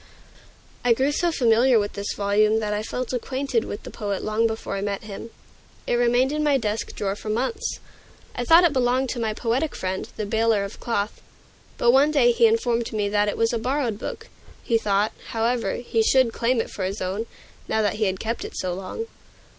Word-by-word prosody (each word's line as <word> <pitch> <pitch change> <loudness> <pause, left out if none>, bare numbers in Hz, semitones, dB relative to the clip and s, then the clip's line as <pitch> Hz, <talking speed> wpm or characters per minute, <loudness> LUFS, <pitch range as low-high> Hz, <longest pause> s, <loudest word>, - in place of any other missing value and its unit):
I 245 -1 +5
grew 265 +5 +1
so 345 +4 +1
familiar 245 -3 +4
with 205 -1 -1
this 200 0 -3
volume 210 +2 +3
that 210 -1 -2
I 210 - -1
felt 250 +3 -4
acquainted 260 -1 -1
with 205 - -6
the - - -8
poet 200 -3 -3
long 215 +2 +1
before 220 -2 -4
I 195 - -3
met 200 0 -3
him. 215 +2 -8 0.6
It - - -1
remained 245 +2 +3
in 300 0 -1
my 290 -2 +3
desk 215 -3 -3
drawer 195 -1 -2
for 215 - -7
months. 260 - -1 0.6
I 245 - -3
thought 330 +8 +7
it 340 -4 +4
belonged 255 0 +1
to 240 - -3
my 220 -2 -1
poetic 250 +8 -1
friend, 190 0 -3
the 215 - -2
baler 220 -1 +2
of 200 - -7
cloth. 215 -3 -2 0.6
But 240 - +4
one 275 +4 +5
day 270 -6 +4
he 235 -1 +5
informed 230 +1 0
me 210 -2 -1
that 205 0 +2
it - - -4
was 230 +1 +1
a 230 - 0
borrowed 245 -3 -1
book; 450 - -6 0.4
he 230 -2 +2
thought, 205 0 +1 0.2
however, 230 -2 0
he 235 -2 0
should 245 +1 +3
claim 240 +1 +1
it - - -7
for 195 - -4
his 195 +3 -3
own, 195 +5 -3 0.4
now 220 0 +1
that 210 0 0
he 215 - +1
had 190 -1 -1
kept 230 +2 -3
it - - -7
so 180 -1 -2
long. 190 - -5
230 Hz, 210 wpm, -24 LUFS, 210-250 Hz, 0.6 s, thought